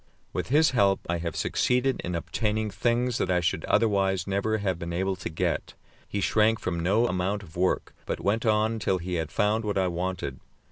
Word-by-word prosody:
With - - -2
his 155 +5 +4
help 100 -6 +3
I 85 0 -1
have 85 -1 -4
succeeded 125 +1 +1
in 90 - -3
obtaining 105 +5 -1
things 120 +2 0
that - - 0
I 90 -1 +3
should 85 - 0
otherwise 95 -4 +2
never 100 +3 0
have 95 -4 -1
been 85 0 -4
able 95 +2 0
to 95 - -5
get. 80 - -2 0.3
He 100 - -2
shrank 110 +3 +3
from 85 -2 -2
no 100 +8 +2
amount 95 +1 -1
of 80 -4 -15
work, 90 +1 0
but - - -2
went 105 +3 0
on 110 0 +2
till 95 -2 +1
he 90 +1 -5
had 80 - -6
found 105 +1 +1
what 105 -2 -1
I 95 -1 +2
wanted. 90 +1 -3
100 Hz, 200 wpm, -27 LUFS, 90-110 Hz, 0.3 s, his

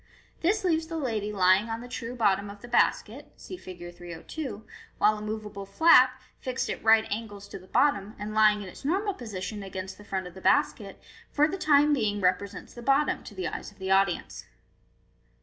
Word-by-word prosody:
This 410 +5 +1
leaves 325 -3 +1
the 330 0 -4
lady 220 -8 -2
lying 190 +2 +3
on 225 0 -3
the 245 - -9
true 245 0 -6
bottom 200 -3 +1
of 200 0 -11
the - - -8
basket 240 - 0
(see - - -9
Fig. 175 - -10
302), 200 - -7 0.3
while 215 +1 +4
a 210 - -8
moveable 210 -2 -6
flap, 260 +2 +5 0.2
fixed 255 0 -3
at - - -6
right 220 0 +5
angles 205 -2 -5
to - - -8
the 185 - -17
bottom, 215 -7 +1
and 210 +1 -5
lying 210 -1 +4
in - - -9
its 180 - -12
normal 390 +8 0
position 215 - -6
flat 195 - -7
against 190 +1 -7
the - - -12
front 190 -2 -3
of 180 - -9
the 190 - -11
basket, - - +1 0.3
for 300 +1 +3
the 365 - -3
time 300 -5 +4
being 215 -6 0
represents 190 +2 -1
the 240 - -10
bottom 275 +4 +2
to 205 - -11
the 185 -2 -3
eyes - - -6
of 205 - -23
the 190 0 -4
audience. 195 -2 +1
215 Hz, 200 wpm, -27 LUFS, 195-260 Hz, 0.3 s, flap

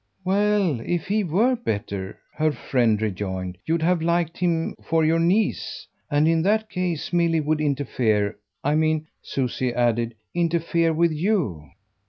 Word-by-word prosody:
"Well, 200 - +2
if 170 +7 -2
he 210 +2 +1
were 210 +10 +2
better," 100 - -4 0.2
her 155 0 +1
friend 120 -4 +1
rejoined, 95 -3 -3
"you'd 165 0 +1
have 175 0 +2
liked 170 0 0
him 170 -2 0
for 165 -1 +2
your 165 +1 +3
niece; 190 +6 0 0.2
and 145 +2 +3
in 165 0 +3
that 215 +4 +1
case 180 -3 -2
Milly 170 -2 +3
would 155 0 0
interfere. 120 -8 0 0.3
I 145 - +2
mean," 155 0 +1 0.2
Susie 130 -1 -2
added, 120 -1 0 0.2
"interfere 170 -1 +1
with 165 +1 +2
YOU." 150 - -1
160 Hz, 145 wpm, -24 LUFS, 120-175 Hz, 0.3 s, your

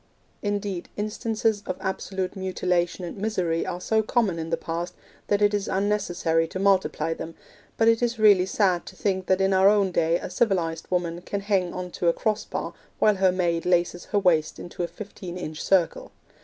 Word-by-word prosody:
Indeed, 205 -3 -3
instances 215 0 -1
of 185 - -3
absolute 190 -1 -3
mutilation 180 -2 -1
and 175 - -7
misery 185 -6 -1
are 180 -1 -3
so 220 +4 +1
common 215 -6 0
in 160 0 -4
the 165 - 0
past 170 +2 -4 0.3
that 205 0 +2
it 205 0 +4
is 205 -1 -1
unnecessary 190 -5 0
to 175 - -6
multiply 190 -4 +2
them; 165 0 -7 0.4
but 225 - +3
it 230 0 +4
is 240 -1 0
really 205 -4 +5
sad 190 -3 +1
to 185 - -9
think 190 -1 -1
that 185 0 +3
in 190 0 +3
our 190 +1 +6
own 200 -2 +3
day 165 0 +2
a - - -7
civilised 175 -6 0
woman 175 -1 -1
can 200 +2 -4
hang 195 -3 +1
on 180 0 -5
to 175 - -2
a 170 - +5
cross 215 +2 -1
bar - - -4 0.2
while 210 -2 +3
her 190 -1 +4
maid 175 -2 0
laces 175 0 +1
her 205 - -1
waist 165 -6 +2
into 175 +1 -7
a 175 - 0
fifteen 180 0 -8
inch 155 -3 -6
circle. 180 -4 +1
185 Hz, 195 wpm, -25 LUFS, 175-205 Hz, 0.4 s, our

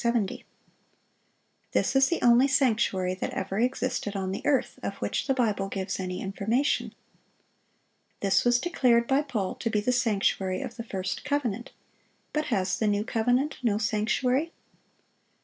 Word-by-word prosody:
70. 235 -5 0 1.3
This - - +1
is 270 0 +5
the 340 - -1
only 245 +3 +6
sanctuary 215 -9 +2
that 185 - -3
ever 195 +2 -2
existed 250 -3 -1
on 190 -1 -2
the 195 - -5
earth, 280 -3 +1
of - - -4
which - - -2
the 270 - +3
Bible 210 -6 0
gives 195 0 -3
any 180 -1 -4
information. 220 +8 0 1.2
This 195 -1 +2
was 245 0 +4
declared 245 -7 +2
by 270 +2 +3
Paul 230 -10 -2
to 230 - -3
be 215 - +1
the 210 +5 +1
sanctuary 200 -6 +1
of - - -7
the 230 - -4
first 190 -4 -4
covenant. 250 -6 -2 0.6
But 305 0 0
has 185 -5 0
the 220 - +1
new 205 0 +1
covenant 245 +5 0
no 225 -5 +1
sanctuary? 230 +8 0
230 Hz, 150 wpm, -27 LUFS, 195-255 Hz, 1.3 s, only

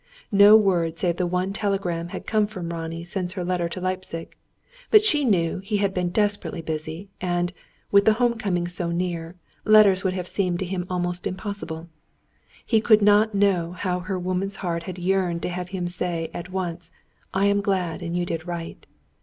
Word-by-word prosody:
No 205 +1 +8
word 175 -6 +1
save 175 0 0
the 180 - 0
one 180 +2 -1
telegram 195 -5 -1
had - - -7
come 215 -2 +2
from 185 -5 -6
Ronnie 165 0 -5
since 180 0 -3
her 185 -3 -4
letter 175 -1 0
to 185 - -5
Leipzig. 185 -2 -4 0.5
But 430 -1 +7
she 300 -9 +3
knew 180 -9 +1
he 205 +2 -2
had 200 -1 0
been 180 -1 0
desperately 205 -3 -1
busy; 160 +4 -5
and, 175 0 -1 0.4
with 200 0 +5
the 220 - +6
home 235 0 +1
coming 175 -5 -1
so 175 -1 -3
near, 170 -1 -3 0.3
letters 210 -3 +6
would 185 -1 0
have 180 -1 -4
seemed 180 -3 0
to 190 - -3
him 180 0 -3
almost 175 -1 -2
impossible. 185 -4 -5 0.8
He 225 -2 +3
could 215 -2 +5
not 210 +1 +4
know 185 -4 +2
how 180 0 -2
her 185 +1 -3
woman's 185 +2 -2
heart 170 -1 -1
had 185 - -6
yearned 180 -1 0
to - - -1
have 180 0 -4
him 180 -2 -3
say 175 -2 -2
at 175 +1 -6
once: 175 -2 -4 0.4
"I 195 +1 +1
am 200 0 +3
glad, 185 -5 -1
and 170 0 -3
you 175 - 0
did 165 -1 -4
right." 170 -1 -6
180 Hz, 190 wpm, -24 LUFS, 175-200 Hz, 0.8 s, No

